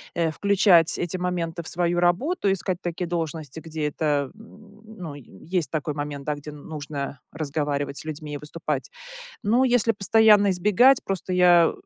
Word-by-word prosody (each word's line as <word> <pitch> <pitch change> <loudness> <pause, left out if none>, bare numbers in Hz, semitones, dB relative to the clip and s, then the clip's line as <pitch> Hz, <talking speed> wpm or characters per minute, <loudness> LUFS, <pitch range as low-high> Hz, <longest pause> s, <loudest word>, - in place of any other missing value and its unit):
э, 165 -2 +1
включать 190 -2 +4
эти 175 +2 -2
моменты 175 -2 -3
в - - -9
свою 175 0 0
работу, 195 - +1
искать 185 -1 -2
такие 175 +1 -3
должности, 160 -3 -4
где 160 -2 -4
это, 145 -2 -1
м, 215 -1 -17 0.2
ну, 165 -5 -7
есть 155 - -4
такой 150 -1 -2
момент, 145 -1 -5
да, 150 - -1
где 145 +1 -9
нужно 145 -2 -6
разговаривать 145 -2 -3
с - - -10
людьми 155 -1 -6
и - - -3
выступать. 150 +4 -4 0.5
Но 235 +6 +3
если 240 -2 +3
постоянно 205 0 +5
избегать 210 +8 +4
просто 190 -1 -3
я 175 -2 +5
170 Hz, 155 wpm, -24 LUFS, 150-195 Hz, 0.5 s, постоянно